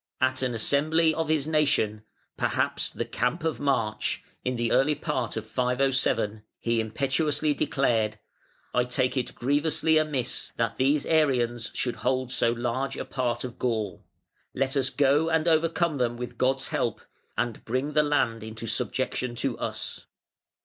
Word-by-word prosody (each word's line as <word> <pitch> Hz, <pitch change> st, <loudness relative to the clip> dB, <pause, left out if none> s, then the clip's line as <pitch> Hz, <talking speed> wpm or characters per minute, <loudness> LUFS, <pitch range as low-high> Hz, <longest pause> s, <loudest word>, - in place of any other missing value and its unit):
At 130 Hz, 0 st, +1 dB
an 125 Hz, -2 st, 0 dB
assembly 155 Hz, +7 st, +3 dB
of 160 Hz, 0 st, -1 dB
his 155 Hz, -3 st, +1 dB
nation 140 Hz, -9 st, +2 dB, 0.3 s
(perhaps -, -, 0 dB
the -, -, -4 dB
"Camp 125 Hz, +8 st, -1 dB
of 160 Hz, -2 st, -1 dB
March") 115 Hz, -7 st, 0 dB, 0.2 s
in 125 Hz, 0 st, -1 dB
the 120 Hz, -1 st, 0 dB
early 150 Hz, +3 st, +4 dB
part 130 Hz, -7 st, -2 dB
of 110 Hz, -, -4 dB
507, 125 Hz, -3 st, +1 dB, 0.2 s
he 115 Hz, 0 st, 0 dB
impetuously 140 Hz, +6 st, +1 dB
declared: 115 Hz, -7 st, +1 dB, 0.6 s
"I 125 Hz, -, +3 dB
take 125 Hz, +1 st, 0 dB
it 130 Hz, -2 st, -2 dB
grievously 150 Hz, +4 st, +2 dB
amiss 140 Hz, -5 st, -2 dB
that 115 Hz, -1 st, 0 dB
these 140 Hz, +2 st, +2 dB
Arians 120 Hz, -7 st, +2 dB
should 125 Hz, -, -1 dB
hold 130 Hz, -1 st, 0 dB
so 120 Hz, -2 st, +2 dB
large 120 Hz, +3 st, -2 dB
a -, -, -4 dB
part 120 Hz, -2 st, -1 dB
of 125 Hz, -1 st, -7 dB
Gaul. 110 Hz, -5 st, -1 dB, 0.5 s
Let 135 Hz, +1 st, 0 dB
us 135 Hz, -1 st, +2 dB
go 145 Hz, +3 st, +3 dB
and 160 Hz, 0 st, +1 dB
overcome 165 Hz, -1 st, +2 dB
them 120 Hz, -1 st, 0 dB
with 125 Hz, 0 st, -6 dB
God's 135 Hz, +1 st, +1 dB
help, 115 Hz, -, -1 dB, 0.4 s
and 120 Hz, -3 st, -2 dB
bring 130 Hz, +5 st, -1 dB
the 150 Hz, -, +5 dB
land 125 Hz, -6 st, +1 dB
into 110 Hz, +1 st, -7 dB
subjection 120 Hz, +2 st, -2 dB
to -, -, -1 dB
us". -, -, -4 dB
130 Hz, 155 wpm, -27 LUFS, 120-150 Hz, 0.6 s, the